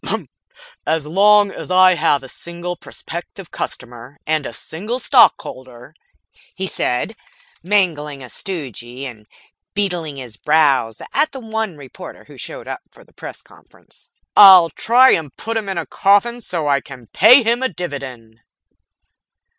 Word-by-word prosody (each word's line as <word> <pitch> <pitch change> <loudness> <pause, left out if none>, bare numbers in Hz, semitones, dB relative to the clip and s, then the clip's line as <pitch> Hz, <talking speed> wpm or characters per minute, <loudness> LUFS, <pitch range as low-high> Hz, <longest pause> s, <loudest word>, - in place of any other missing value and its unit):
"As 160 -1 0
long 205 +5 +4
as - - -9
I 185 0 +6
have 150 -4 +1
a - - -10
single 170 +5 -7
prospective 175 +2 -9
customer, 120 +3 -8
and 155 -2 -1
a - - -7
single 200 - -6
Stockholder," 130 - +1 0.6
he 190 - -3
said, 185 - -2 0.5
mangling 160 -7 0
a 125 - -10
stogie 130 - -6
and 110 -5 -10 0.5
beetling 175 -7 -2
his 125 -6 -9
brows 140 -7 +1
at 305 - +1
the 265 - -7
one 220 -6 -4
reporter 135 -4 -12
who'd - - -13
showed - - -9
up - - -6
for - - -20
the - - -27
press - - -10
conference, - - -19 0.3
"I'll 185 -4 +9
try 255 +3 +4
to 160 -3 -5
put 225 +1 -5
him 215 -3 -3
in 190 - -3
a - - -3
coffin 205 +5 +1
so 170 -8 -3
I 140 -2 +2
can 130 -4 -12
pay 235 - +6
him 235 +2 +1
a 260 - 0
dividend." 130 - -8
165 Hz, 145 wpm, -18 LUFS, 135-205 Hz, 0.6 s, I'll